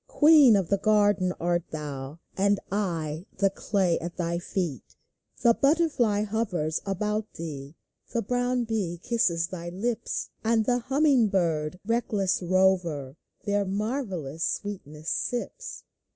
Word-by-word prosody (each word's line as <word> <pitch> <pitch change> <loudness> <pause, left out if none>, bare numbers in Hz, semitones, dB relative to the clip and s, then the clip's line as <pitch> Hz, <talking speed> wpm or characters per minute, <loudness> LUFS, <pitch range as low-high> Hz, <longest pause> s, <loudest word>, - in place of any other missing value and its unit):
Queen 295 -6 +7
of 190 -4 0
the 200 - +2
garden 205 -3 +3
art 175 0 0
thou, 145 -2 -6 0.2
And 200 +1 +2
I— 170 -4 -2
the 195 0 +3
Clay 190 -4 0
at 170 +1 -6
thy 170 -1 -1
feet! 170 - -4 0.5
The 235 - +6
butterfly 275 -8 +2
hovers 200 -8 -1
about 210 +2 -1
thee; 145 -2 -7 0.4
The 235 - -1
brown 245 +2 0
bee 205 -7 -2
kisses 175 -8 +1
thy 175 -2 -6
lips; 220 +6 -3
And 225 -1 +2
the 245 +1 +2
humming 270 -1 +3
bird, 170 -4 0
reckless 210 -5 0
rover, 175 -7 +1 0.3
Their 205 -1 +1
marvellous 195 - -3
sweetness 160 -7 -3
sips. - - -3
195 Hz, 125 wpm, -27 LUFS, 170-225 Hz, 0.5 s, Queen